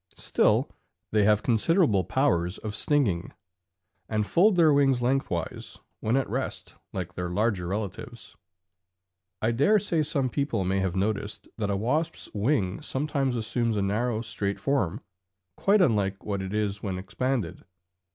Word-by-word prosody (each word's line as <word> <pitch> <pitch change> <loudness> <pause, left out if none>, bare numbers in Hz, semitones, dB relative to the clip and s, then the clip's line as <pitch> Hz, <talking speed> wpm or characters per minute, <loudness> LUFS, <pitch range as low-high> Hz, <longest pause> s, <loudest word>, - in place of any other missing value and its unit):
Still - - +2 0.4
they 105 -1 +3
have 105 0 +3
considerable 120 - +3
powers 90 - +1
of 110 -1 -5
stinging, 105 - 0 0.8
and 110 -1 0
fold 190 - +4
their 160 -4 +5
wings 135 -3 +3
lengthwise 120 - -1 0.2
when 115 +4 +1
at 135 - 0
rest - - -4 0.2
like 90 -2 -5
their 90 0 -3
larger 100 -1 0
relatives. 105 +3 -5 1.1
I 110 - +3
dare 145 - +4
say 175 -6 0
some 140 -3 0
people 130 -5 -1
may 95 +1 +1
have 95 -2 -1
noticed 100 +1 -2
that 105 -2 -1
a 100 - 0
wasp's 150 +10 -1
wing 100 -4 0
sometimes 135 -2 -1
assumes 115 0 0
a 100 - +1
narrow 110 +3 0
straight 100 -3 -2
form, 125 -6 0 0.5
quite 200 -1 +4
unlike 100 - 0
what 100 -2 -2
it 95 0 -5
is 105 -1 -1
when 95 -3 -3
expanded. 100 0 -2
110 Hz, 145 wpm, -27 LUFS, 100-135 Hz, 1.1 s, their